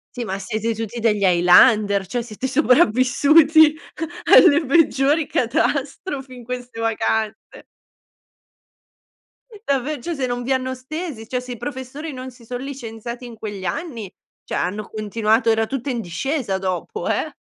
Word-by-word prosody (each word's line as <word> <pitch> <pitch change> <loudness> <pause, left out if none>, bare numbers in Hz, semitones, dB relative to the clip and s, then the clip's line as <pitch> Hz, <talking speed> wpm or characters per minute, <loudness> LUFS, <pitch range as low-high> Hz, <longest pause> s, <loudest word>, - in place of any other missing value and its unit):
Sì 245 -2 -4
ma 195 -1 -3
siete 220 +3 -3
tutti 225 +1 -5
degli 210 -3 +1
highlander, 195 +3 +5
cioè 240 +6 -3
siete 230 +2 -7
sopravvissuti 285 +4 +4 0.5
alle 330 -3 +7
peggiori 290 0 +3
catastrofi 275 +1 -2
in 245 - -11
queste 245 -1 -7
vacanze. 220 -1 -2 2.0
Davve 280 +1 -1
cioè 340 +6 -4
se 270 -3 -2
non 245 0 -3
vi 265 - -3
hanno 260 0 -1
stesi, 260 -2 -7
cioè 250 +1 -2
se 250 0 -7
i 240 - -9
professori 275 +4 -6
non 255 0 -7
si 240 -2 -18
son 245 +2 -5
licenziati 240 -3 -7
in 235 -2 -10
quegli 205 -3 -7
anni, 230 - -4 0.3
cioè - - -4
hanno 205 +4 -3
continuato 220 +2 0
era 225 0 +2
tutta 270 0 -4
in 240 -3 -2
discesa 225 - -2
dopo, 190 - -4
eh. - - -1
245 Hz, 145 wpm, -21 LUFS, 220-275 Hz, 2.0 s, alle